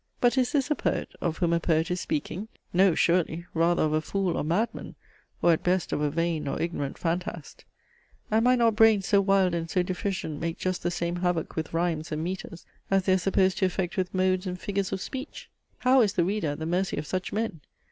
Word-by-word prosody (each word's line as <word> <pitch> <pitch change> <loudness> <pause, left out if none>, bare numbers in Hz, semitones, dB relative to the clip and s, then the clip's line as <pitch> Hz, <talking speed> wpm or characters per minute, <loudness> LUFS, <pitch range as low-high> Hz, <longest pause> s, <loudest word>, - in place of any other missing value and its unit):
But 245 0 +3
is 255 -2 +2
this 285 0 0
a - - +4
poet, - - -1
of 165 -2 -1
whom 170 -2 +1
a 170 - +3
poet 165 +1 +1
is 180 - -1
speaking? 285 - -3 0.3
No 185 -1 +4
surely! 170 -1 +1
rather 170 +1 +2
of 155 -1 +1
a 155 - +2
fool 190 +1 -1
or - - -1
madman: 210 +9 -2 0.5
or 170 - +6
at 160 - -1
best 180 0 0
of - - -1
a 150 - +2
vain 165 0 -1
or - - -2
ignorant 160 -5 -3
phantast! 170 -2 -4 0.7
And 220 +2 +3
might 250 0 +5
not 230 -2 +3
brains 215 -3 +5
so 200 -2 +4
wild 195 -2 +3
and 165 -1 -2
so 180 +2 +1
deficient 180 -4 -3
make 165 0 -2
just 185 -1 -2
the 175 - 0
same 175 0 -2
havoc 175 -2 -1
with 160 0 -3
rhymes 165 -1 -1
and 155 +1 -2
metres, 175 -1 -6 0.2
as 195 -1 +3
they 185 - +3
are - - +4
supposed 190 0 +2
to 190 - +3
effect 185 0 -2
with 185 -2 -1
modes 185 0 +1
and 180 0 -4
figures 200 -1 -2
of 190 - -3
speech? 265 +2 -7 0.3
How 255 +1 +4
is 205 -3 +2
the 175 -4 +2
reader 200 -2 -1
at 145 0 -2
the 160 - -4
mercy 180 +3 0
of 150 - -3
such 185 +3 -3
men? 215 -8 -2
180 Hz, 230 wpm, -27 LUFS, 165-195 Hz, 0.7 s, or